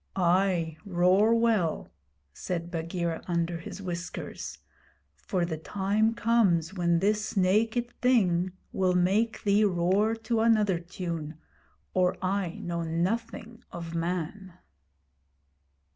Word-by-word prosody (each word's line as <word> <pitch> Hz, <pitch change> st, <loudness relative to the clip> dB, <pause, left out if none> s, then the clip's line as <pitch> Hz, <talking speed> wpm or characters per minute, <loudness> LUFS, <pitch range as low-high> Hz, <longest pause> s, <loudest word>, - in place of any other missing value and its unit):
'Ay, 175 Hz, -3 st, +2 dB
roar 190 Hz, +4 st, +3 dB
well,' 225 Hz, -8 st, +1 dB, 0.4 s
said 170 Hz, -, -4 dB
Bagheera, 170 Hz, 0 st, -3 dB
under 170 Hz, -1 st, -1 dB
his 195 Hz, +3 st, -8 dB
whiskers; 175 Hz, -1 st, -6 dB, 0.6 s
'for 180 Hz, -4 st, -2 dB
the 160 Hz, -2 st, -4 dB
time 205 Hz, +6 st, 0 dB
comes 200 Hz, -8 st, +2 dB
when 170 Hz, -2 st, +2 dB
this 210 Hz, +3 st, 0 dB
naked 220 Hz, +6 st, +2 dB
thing 185 Hz, -8 st, +3 dB, 0.2 s
will 185 Hz, -1 st, +1 dB
make 200 Hz, +6 st, +1 dB
thee 205 Hz, +1 st, +3 dB
roar 195 Hz, +3 st, +2 dB
to 225 Hz, 0 st, -1 dB
another 215 Hz, -6 st, +3 dB
tune, 170 Hz, -3 st, -5 dB, 0.6 s
or 180 Hz, -1 st, +2 dB
I 185 Hz, -2 st, -1 dB
know 170 Hz, -1 st, -2 dB
nothing 225 Hz, +7 st, -3 dB
of 170 Hz, -1 st, -7 dB
man.' 180 Hz, +2 st, -3 dB
185 Hz, 110 wpm, -28 LUFS, 170-215 Hz, 0.6 s, roar